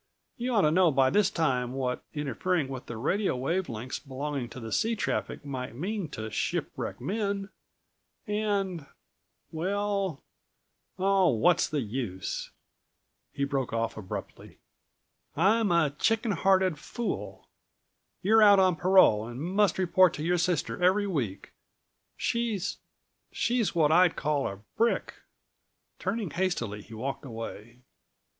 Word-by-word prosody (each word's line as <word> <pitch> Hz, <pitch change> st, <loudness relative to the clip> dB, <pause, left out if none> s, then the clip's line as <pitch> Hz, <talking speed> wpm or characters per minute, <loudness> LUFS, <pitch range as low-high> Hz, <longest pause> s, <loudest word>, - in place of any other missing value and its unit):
You 245 Hz, 0 st, -2 dB
ought 205 Hz, -, +5 dB
to 150 Hz, -, +4 dB
know 180 Hz, +1 st, +5 dB
by 135 Hz, -2 st, +3 dB
this 205 Hz, -2 st, +3 dB
time 130 Hz, -, 0 dB
what 130 Hz, -2 st, -2 dB
interfering 150 Hz, +3 st, -1 dB
with 130 Hz, -2 st, -7 dB
the 120 Hz, -, -6 dB
radio 190 Hz, -, 0 dB
wave 165 Hz, +8 st, -1 dB
lengths 120 Hz, +2 st, -5 dB
belonging 140 Hz, -2 st, -4 dB
to 115 Hz, -3 st, -8 dB
sea 225 Hz, +1 st, +1 dB
traffic 205 Hz, -, -3 dB
might 130 Hz, -4 st, -5 dB
mean 190 Hz, -, -3 dB
to 110 Hz, -5 st, -6 dB
shipwrecked 100 Hz, -, -3 dB
men; 200 Hz, -, -2 dB, 0.8 s
and—well—Oh, 195 Hz, -1 st, -3 dB, 1.1 s
what's 170 Hz, +8 st, +3 dB
the 150 Hz, -2 st, -1 dB
use!" 110 Hz, -5 st, -4 dB, 0.8 s
he 140 Hz, -, -3 dB
broke 135 Hz, -4 st, -1 dB
off 115 Hz, 0 st, -1 dB
abruptly. 100 Hz, -4 st, -8 dB, 0.8 s
"I'm 205 Hz, +5 st, +3 dB
a 170 Hz, -4 st, +3 dB
chicken 225 Hz, -, +1 dB
hearted 190 Hz, -3 st, +2 dB
fool. 240 Hz, +7 st, -5 dB, 0.8 s
You're 220 Hz, +3 st, +5 dB
out 205 Hz, -1 st, +8 dB
on 185 Hz, -3 st, +4 dB
parole 175 Hz, -, +5 dB
and 120 Hz, +1 st, -7 dB
must 185 Hz, +4 st, +1 dB
report 185 Hz, -1 st, +4 dB
to 150 Hz, -, -5 dB
your 175 Hz, +2 st, +1 dB
sister 175 Hz, 0 st, -1 dB
every 190 Hz, +3 st, +4 dB
week. 130 Hz, -, -3 dB, 0.7 s
She's—she's 230 Hz, +1 st, -2 dB
what 155 Hz, -3 st, +4 dB
I'd 175 Hz, +1 st, +5 dB
call 150 Hz, -2 st, 0 dB
a 100 Hz, 0 st, -7 dB
brick!" 230 Hz, +1 st, +1 dB, 0.9 s
Turning 215 Hz, -8 st, -2 dB
hastily 175 Hz, -, -1 dB
he 110 Hz, +2 st, -12 dB
walked 130 Hz, +5 st, -4 dB
away. 115 Hz, -1 st, -8 dB
165 Hz, 125 wpm, -28 LUFS, 130-195 Hz, 1.1 s, out